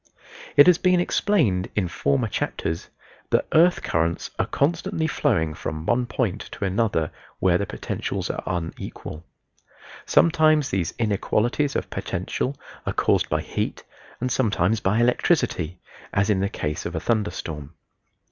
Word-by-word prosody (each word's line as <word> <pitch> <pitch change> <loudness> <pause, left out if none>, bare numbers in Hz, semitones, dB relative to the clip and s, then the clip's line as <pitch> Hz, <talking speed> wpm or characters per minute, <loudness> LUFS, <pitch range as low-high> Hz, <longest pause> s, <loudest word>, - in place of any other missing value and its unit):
It 145 - +10
has 180 -2 +6
been 180 -1 +4
explained 140 - +1
in 95 -4 +1
former 70 -4 0
chapters 80 +1 -3 0.4
that - - +2
earth 175 +3 +5
currents 80 +1 -1
are - - +1
constantly 160 +2 0
flowing 80 - +1
from 80 +1 -5
one 120 +4 +1
point 110 -4 -1
to - - -3
another 95 -5 0 0.3
where 90 -2 +3
the 100 - -2
potentials - - -3
are - - -5
unequal. 80 -2 -5 0.8
Sometimes 155 -3 +4
these 90 -4 -1
inequalities 115 +5 0
of - - -2
potential 135 +2 -3 0.3
are - - 0
caused - - +2
by - - +1
heat - - -3 0.4
and 125 +1 -1
sometimes 110 -4 +2
by 100 +1 +1
electricity, 120 - +1 0.3
as 100 +2 +2
in 95 - +2
the 100 +1 0
case 75 +1 -3
of 85 - -6
a - - 0
thunder 105 +4 +1
storm. 75 -3 -7
105 Hz, 145 wpm, -24 LUFS, 85-135 Hz, 0.8 s, It